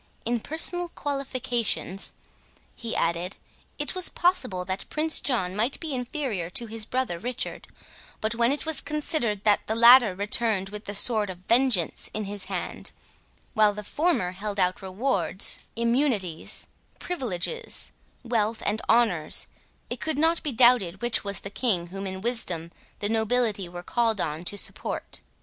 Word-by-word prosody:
In 240 Hz, +1 st, 0 dB
personal 345 Hz, +6 st, -1 dB
qualifications," 250 Hz, -, -3 dB, 0.6 s
he 230 Hz, -2 st, -5 dB
added, 170 Hz, +3 st, -1 dB, 0.4 s
"it -, -, -2 dB
was 370 Hz, -1 st, +5 dB
possible 345 Hz, -, +1 dB
that 190 Hz, +1 st, -4 dB
Prince 310 Hz, +1 st, +3 dB
John 190 Hz, -9 st, -1 dB
might 230 Hz, +6 st, 0 dB
be 320 Hz, -4 st, -4 dB
inferior 245 Hz, -, -3 dB
to 235 Hz, +6 st, -2 dB
his 220 Hz, -1 st, 0 dB
brother 245 Hz, -9 st, -2 dB
Richard; 250 Hz, +4 st, -5 dB, 0.5 s
but 220 Hz, +1 st, 0 dB
when 235 Hz, +2 st, +3 dB
it 290 Hz, -, -1 dB
was 320 Hz, -3 st, +1 dB
considered 285 Hz, -9 st, -1 dB
that 210 Hz, -1 st, +3 dB
the 220 Hz, -, 0 dB
latter 235 Hz, -3 st, +7 dB
returned 205 Hz, 0 st, 0 dB
with 210 Hz, +1 st, -8 dB
the 205 Hz, -, -2 dB
sword 210 Hz, 0 st, +3 dB
of 185 Hz, -, -6 dB
vengeance 235 Hz, -8 st, +2 dB
in 215 Hz, -, -2 dB
his 200 Hz, -1 st, -5 dB
hand, -, -, -5 dB, 0.6 s
while 215 Hz, -1 st, +4 dB
the 210 Hz, -, -6 dB
former 295 Hz, -, 0 dB
held 200 Hz, +2 st, -5 dB
out 180 Hz, 0 st, +1 dB
rewards, 195 Hz, -1 st, +3 dB, 0.2 s
immunities, 235 Hz, -, 0 dB, 0.3 s
privileges, 310 Hz, -, -3 dB, 0.3 s
wealth, 230 Hz, -2 st, -1 dB
and 210 Hz, +2 st, 0 dB
honours, 210 Hz, -10 st, +3 dB, 0.5 s
it -, -, -4 dB
could 315 Hz, -2 st, -2 dB
not 325 Hz, +2 st, +2 dB
be 295 Hz, -, -2 dB
doubted 235 Hz, -6 st, +4 dB
which 240 Hz, -2 st, 0 dB
was 200 Hz, -1 st, -2 dB
the 200 Hz, -, -7 dB
king 205 Hz, -7 st, 0 dB
whom 195 Hz, 0 st, -4 dB
in 190 Hz, 0 st, -5 dB
wisdom 185 Hz, -8 st, 0 dB, 0.3 s
the 205 Hz, -, +1 dB
nobility 220 Hz, -3 st, +1 dB
were 175 Hz, 0 st, -8 dB
called 225 Hz, 0 st, 0 dB
on 155 Hz, 0 st, -2 dB
to 205 Hz, -, 0 dB
support." -, -, -3 dB
220 Hz, 155 wpm, -26 LUFS, 195-255 Hz, 0.6 s, latter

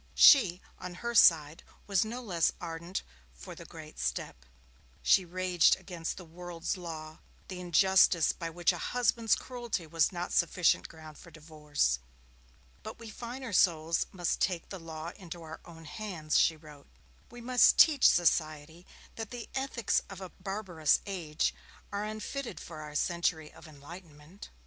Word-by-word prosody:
She, 190 Hz, -10 st, +7 dB, 0.2 s
on 180 Hz, -1 st, -7 dB
her 235 Hz, -, -1 dB
side, 160 Hz, -7 st, +5 dB, 0.2 s
was 195 Hz, -3 st, +2 dB
no 240 Hz, +3 st, -6 dB
less 175 Hz, -7 st, +1 dB
ardent 170 Hz, +2 st, -5 dB, 0.3 s
for -, -, -10 dB
the -, -, -11 dB
great -, -, -12 dB
step. -, -, -4 dB, 0.6 s
She 190 Hz, -, +4 dB
raged 180 Hz, -1 st, +3 dB
against 175 Hz, -3 st, -6 dB
the 180 Hz, -, -9 dB
world's 170 Hz, +1 st, -5 dB
law, 160 Hz, -3 st, -8 dB, 0.3 s
the 185 Hz, -1 st, -6 dB
injustice 180 Hz, -1 st, +4 dB
by 165 Hz, -2 st, -6 dB
which 175 Hz, +1 st, +1 dB
a -, -, -6 dB
husband's 235 Hz, -2 st, +1 dB
cruelty 240 Hz, -8 st, -5 dB
was 165 Hz, 0 st, +1 dB
not 175 Hz, -1 st, -5 dB
sufficient 170 Hz, 0 st, +2 dB
ground 155 Hz, -2 st, -13 dB
for 170 Hz, -, -14 dB
divorce. 150 Hz, -, -2 dB, 0.8 s
'But -, -, -8 dB
we 230 Hz, -1 st, -10 dB
finer 240 Hz, +1 st, -7 dB
souls 165 Hz, -2 st, +2 dB
must 175 Hz, -3 st, -2 dB
take 175 Hz, -3 st, -1 dB
the 190 Hz, -, -7 dB
law 165 Hz, 0 st, -7 dB
into 175 Hz, -2 st, -9 dB
our 160 Hz, 0 st, -9 dB
own 165 Hz, -2 st, -13 dB
hands,' 160 Hz, -3 st, -2 dB
she 160 Hz, -, +3 dB
wrote. 150 Hz, -2 st, -15 dB, 0.4 s
'We 240 Hz, -, -11 dB
must 250 Hz, +1 st, +4 dB
teach 295 Hz, -5 st, +7 dB
society 160 Hz, 0 st, 0 dB, 0.3 s
that 225 Hz, -2 st, -5 dB
the 245 Hz, -2 st, -8 dB
ethics 265 Hz, -5 st, 0 dB
of 195 Hz, -2 st, -9 dB
a 190 Hz, -1 st, -8 dB
barbarous 190 Hz, -7 st, -1 dB
age 165 Hz, -6 st, -2 dB, 0.4 s
are 205 Hz, +1 st, -3 dB
unfitted 215 Hz, +5 st, -5 dB
for 155 Hz, -2 st, -9 dB
our 150 Hz, -1 st, -9 dB
century 165 Hz, -1 st, -1 dB
of -, -, -14 dB
enlightenment.' 155 Hz, +3 st, -13 dB
175 Hz, 155 wpm, -30 LUFS, 160-195 Hz, 0.8 s, She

